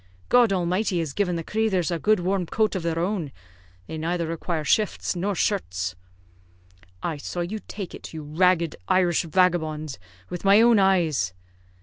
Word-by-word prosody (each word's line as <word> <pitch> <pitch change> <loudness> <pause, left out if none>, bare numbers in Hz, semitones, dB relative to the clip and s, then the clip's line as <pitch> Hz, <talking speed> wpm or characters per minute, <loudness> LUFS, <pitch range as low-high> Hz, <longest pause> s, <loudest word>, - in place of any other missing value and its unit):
God 245 -3 +5
Almighty 185 +1 0
has 160 -5 -2
given 180 -1 0
the 165 - -3
crathers 195 -4 0
a 170 - -1
good 215 +2 +3
warm 185 0 0
coat 215 +4 +1
of 185 - -1
their 165 -1 -2
own; 175 -4 -1 0.5
they 160 - -6
neither 170 +1 -1
require 165 0 -3
shifts 210 +3 +1
nor 195 +3 -1
shirts." 95 - -1 1.1
"I 160 - -2
saw 175 +4 -4
you 195 +6 -3
take 195 -4 -6
it, - - -9
you 160 -2 -7
ragged 170 +1 +2
Irish 185 -3 +3
vagabond, 155 - 0 0.3
with 180 - -6
my 200 +1 +6
own 230 -1 +6
eyes." 165 - +2
175 Hz, 160 wpm, -25 LUFS, 160-195 Hz, 1.1 s, my